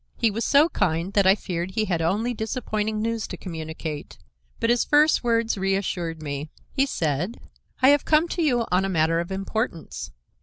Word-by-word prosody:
He 230 -2 +2
was 225 +3 -2
so 290 +6 +5
kind 170 - -1
that 200 -2 +4
I 190 - +7
feared 180 -2 -4
he 220 - +1
had 175 -5 -1
only 210 +9 0
disappointing 220 -2 -2
news 230 -2 -2
to - - -7
communicate, 160 -3 -6 0.4
but 230 - +2
his 240 - +3
first 300 0 +4
words 230 -3 +1
reassured 180 -4 -1
me. 145 +1 -4 0.2
He 275 0 +1
said: 170 - -2 0.4
"I 260 - +8
have 290 -1 +4
come 310 +2 +3
to 345 - -2
you 245 -7 +2
on 180 +1 +3
a 195 - -1
matter 165 -1 +2
of 170 +2 -4
importance. 195 -2 -3
200 Hz, 185 wpm, -24 LUFS, 170-230 Hz, 0.4 s, I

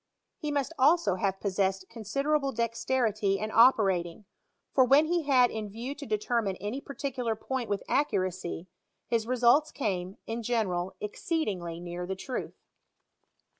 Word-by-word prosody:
He 305 -4 -3
must 285 +2 -1
also 280 - +4
have 195 0 -1
possessed 195 -1 0
considerable 275 +6 -1
dexterity 230 -3 0
in 215 +2 -4
operating, 200 -6 +4 0.5
for 260 - +6
when 275 +5 +5
he 340 -1 0
had 250 -3 +5
in 215 -2 -4
view 235 +7 -5
to 285 -1 -9
determine 215 -1 0
any 210 +9 -4
particular 260 -5 -3
point 255 +2 -4
with 205 - -1
accuracy, 185 - -1 0.4
his 230 -1 0
results 255 +5 +4
came, 190 -5 -3
in 230 +1 -4
general, 190 -6 -1
exceedingly 205 - -3
near 175 0 -5
the 190 - -2
truth. 250 +7 -5
225 Hz, 135 wpm, -29 LUFS, 195-265 Hz, 0.5 s, for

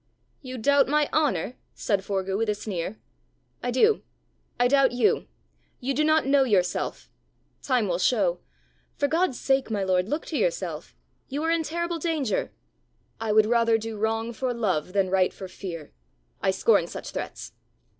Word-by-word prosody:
"You 255 -2 -7
doubt 280 +4 +4
my 300 +1 +2
honour?" 255 - +1 0.2
said 200 -3 0
Forgue 195 -1 -2
with 220 +1 0
a 210 - +1
sneer. 200 -1 -4 0.6
"I 245 - -2
do. 425 - +3 0.6
I 245 - +5
doubt 270 -1 +4
you. 245 -1 +2 0.5
You 270 +2 -1
do 300 - +1
not 310 -1 +3
know 275 0 +4
yourself. 195 -8 0 0.5
Time 250 -6 +1
will 175 -1 -1
show. 185 -5 +2 0.6
For 285 - +1
God's 325 -4 +1
sake, 270 -2 +1
my 205 -3 -1
lord, 185 +1 +1
look 300 +2 -2
to 315 - -2
yourself! - - -2 0.3
You 285 +3 -3
are 325 - +1
in 335 0 +2
terrible 340 +2 -2
danger." 310 -8 -1 0.7
"I 225 -1 -1
would 215 0 +5
rather 230 0 +3
do 225 0 -5
wrong 225 +2 -1
for 250 +1 -2
love 185 -7 -1
than 195 -2 +1
right 190 -1 +3
for 190 - -8
fear. 175 -5 -7 0.5
I - - +2
scorn - - +3
such - - -7
threats." - - -6
235 Hz, 165 wpm, -26 LUFS, 200-285 Hz, 0.7 s, I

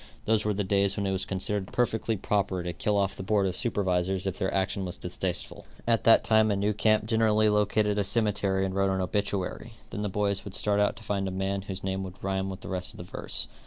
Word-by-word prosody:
Those 110 -1 +2
were 105 - +1
the 105 - 0
days 100 0 +1
when 100 - -1
it 95 - 0
was 95 0 -1
considered 95 +1 -2
perfectly 115 -2 0
proper 95 -2 0
to 90 0 -3
kill 105 +6 0
off 100 -1 +1
the - - -7
board 100 +1 +1
of 90 -1 -1
supervisors 95 -4 0
if 95 -1 -3
their 95 - 0
action 95 0 0
was 90 0 -4
distasteful. 90 0 -4 0.2
At 115 -1 +2
that 115 - +7
time 110 -1 +4
a 100 - +2
new 100 +2 +1
camp 110 +1 +2
generally 110 -1 +3
located 105 0 +2
a - - +2
cemetery 100 -2 +1
and 95 - -3
wrote 95 0 +2
an 95 0 0
obituary; 100 +3 -2 0.2
then 105 - -4
the 105 - -1
boys 100 0 0
would 100 - -6
start 105 -1 +1
out 105 - +2
to - - -13
find 100 -2 -1
a - - -3
man 95 +1 -2
whose 95 -1 -6
name 95 0 -2
would 95 -1 -8
rhyme 95 0 -1
with 95 - -7
the - - -8
rest 95 -1 -3
of - - -13
the - - -7
verse. - - 0
100 Hz, 245 wpm, -28 LUFS, 95-105 Hz, 0.2 s, that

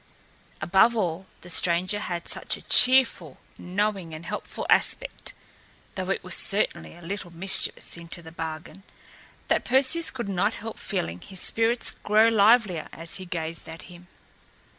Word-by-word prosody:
Above 190 +8 +4
all, 185 -2 -2
the 180 - -12
stranger 180 +5 +1
had 175 -4 -5
such - - -1
a - - -16
cheerful, 250 - +4 0.2
knowing 190 -3 -2
and 160 +2 -10
helpful - - -6
aspect - - 0 0.6
(though - - -5
it - - -2
was - - +2
certainly 80 -1 +1
a - - -15
little 185 +1 -6
mischievous, 175 +3 +1
into 170 +1 -6
the 160 - -11
bargain) 160 +3 -7 0.7
that - - +1
Perseus 270 +6 +4
could 235 -5 -6
not 200 +3 0
help 225 0 -8
feeling 85 +2 -4
his 190 -2 -6
spirits 230 +1 +1
grow 215 +2 +3
livelier 215 -5 +3
as 165 0 -5
he 185 -1 -9
gazed 165 -1 -5
at 165 0 -10
him. 175 +1 -15
185 Hz, 150 wpm, -25 LUFS, 165-215 Hz, 0.7 s, Above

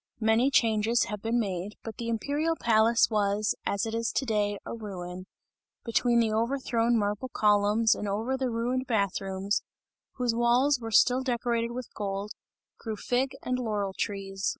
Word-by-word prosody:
Many 225 +4 +3
changes 225 -2 +3
have 210 -1 -5
been 230 +2 0
made, 195 -1 -3
but 225 -2 -7
the 235 - -4
imperial 290 +8 0
palace, 230 0 +4
was, 210 0 +1
as 200 +1 0
it 225 - -4
is 230 0 -1
to 270 - 0
day, 205 -3 0
a - - -5
ruin; 185 -4 -7 0.6
between 235 0 +2
the 225 -2 +2
overthrown 235 0 +1
marble 210 +4 -1
columns 210 +1 +3
and 210 - -4
over 220 +6 -1
the 260 -1 -1
ruined 245 +3 -1
bath 200 -5 0
rooms, 195 +1 -1 0.5
whose 245 -3 0
walls 245 +4 +3
were 225 -1 -5
still 250 +3 +4
decorated 235 -2 -1
with 245 0 -7
gold, 200 0 -4 0.5
grew 220 -2 -4
fig 255 +5 -1
and 255 0 -1
laurel 210 -5 -2
trees. 195 -1 -2
225 Hz, 165 wpm, -28 LUFS, 205-240 Hz, 0.6 s, palace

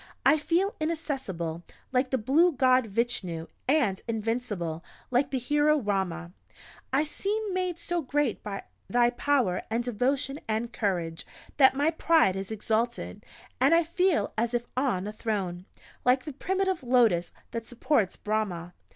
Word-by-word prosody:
I 310 - +6
feel 355 +7 +1
inaccessible, 265 - -3 0.3
like 255 0 +1
the 260 - +1
blue 295 +10 +3
God 255 -2 +4
Vichnu, 195 -7 -1 0.2
and 255 -10 +2
invincible, 215 -7 -2 0.3
like 255 +3 +2
the 265 - -1
hero 295 +4 +3
Rama! 190 - -2 0.6
I 270 +3 +3
seem 405 +6 -2
made 365 -2 -1
so 345 0 -2
great 280 -3 0
by 200 -2 -5 0.3
thy 240 0 +4
power, 250 -7 +1
and 230 +2 0
devotion, 255 +4 -1
and 225 +2 -2
courage, 175 -6 -1 0.3
that 265 -2 +6
my 290 +4 +2
pride 320 - +3
is 195 0 -4
exalted, 220 +2 -2 0.4
and 330 - +5
I 340 - +4
feel 360 +1 +1
as 235 +1 0
if 240 0 -1
on 250 -8 0
a 210 - -5
throne 195 -5 -3 0.4
like 255 +1 +3
the 300 - -5
primitive 380 +4 -1
Lotus 235 -9 +3 0.2
that 230 -1 -5
supports 240 -4 +1
Brahmah. 190 -5 -2
245 Hz, 145 wpm, -28 LUFS, 205-295 Hz, 0.6 s, I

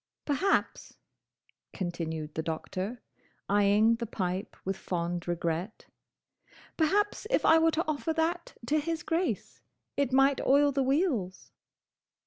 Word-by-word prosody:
"Perhaps," 345 +7 0 0.8
continued 160 -4 -4
the 160 - -2
Doctor, 185 +8 -4 0.4
eyeing 205 +3 +4
the 235 0 -4
pipe 190 -2 -3
with 195 +1 -1
fond 175 -1 -3
regret, 175 +3 -3 0.9
"perhaps 410 +7 +1
if - - +2
I 325 - +7
were 325 0 +4
to 325 +1 0
offer 310 0 -1
that 335 +2 -2
to 305 +6 +2
his 325 +2 -3
Grace, 340 +3 -2 0.3
it 280 -2 0
might 270 +1 +4
oil 285 +1 +4
the 275 0 0
wheels." 265 - 0
240 Hz, 120 wpm, -29 LUFS, -, 0.9 s, I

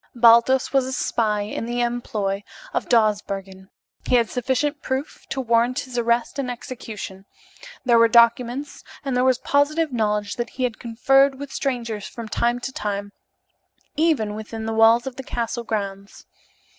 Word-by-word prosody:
Baldos 235 +3 +5
was 270 -2 +3
a 260 - -4
spy 215 -5 0
in 210 +2 -4
the 240 0 -1
employ 215 -5 -2 0.3
of - - -2
Dawsbergen. 200 -4 0 0.4
He - - +3
had 235 -2 +2
sufficient 270 +4 -1
proof 265 +3 -4
to 270 - -3
warrant 240 +2 +2
his 255 -3 -9
arrest 235 +2 0
and 260 -2 -2
execution; 220 -6 -7 0.6
there 235 -2 +5
were 230 - +7
documents, 240 +4 +2 0.2
and 270 -2 -1
there 250 - +2
was 260 -1 +3
positive 285 +3 +1
knowledge 210 -3 -1
that 240 0 -2
he 255 - -5
had 240 -3 -2
conferred 270 +4 +3
with 280 0 -8
strangers 235 -6 -3
from 230 -2 -8
time 240 +2 0
to 265 - -4
time, 205 -2 -3 0.8
even 295 -10 +1
within 220 +1 -6
the 225 - -2
walls 225 +2 +5
of 265 -2 -6
the 265 - -6
castle 235 -1 -3
grounds. 200 -3 -5
235 Hz, 160 wpm, -23 LUFS, 220-260 Hz, 0.8 s, were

